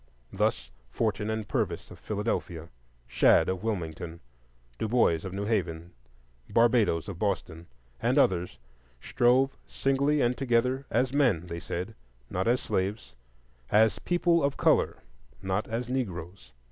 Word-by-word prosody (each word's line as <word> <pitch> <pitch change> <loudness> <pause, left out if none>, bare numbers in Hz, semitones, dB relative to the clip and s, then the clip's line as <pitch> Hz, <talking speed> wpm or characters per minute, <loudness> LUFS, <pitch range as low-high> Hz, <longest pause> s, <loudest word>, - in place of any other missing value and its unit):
Thus, - - -1 0.2
Forten 105 - -1
and 110 -1 -3
Purvis - - -2
of - - -12
Philadelphia, 100 -6 -3 0.4
Shad - - +4
of 95 -1 -2
Wilmington, 85 -6 -4 0.6
Du - - -1
Bois 105 -9 +3
of 95 - -5
New 100 +2 -3
Haven, 90 -6 -2 0.6
Barbadoes 115 -8 +3
of 95 -4 -7
Boston, 85 -5 -2 0.3
and - - +1
others, 90 -1 +2 0.4
strove 125 - +2
singly 140 +2 +1
and 125 -1 +2
together 130 +1 0
as 130 0 +1
men, 125 - +2
they 85 -1 -6
said, 90 +5 -5 0.4
not 95 +4 -1
as 120 +2 +2
slaves; 100 +4 -2 0.6
as 110 -1 +4
"people 175 -2 +2
of 140 0 0
color," - - +2 0.4
not 95 - -2
as 115 +2 -3
"Negroes." 95 - -4
105 Hz, 135 wpm, -28 LUFS, 90-125 Hz, 0.6 s, Shad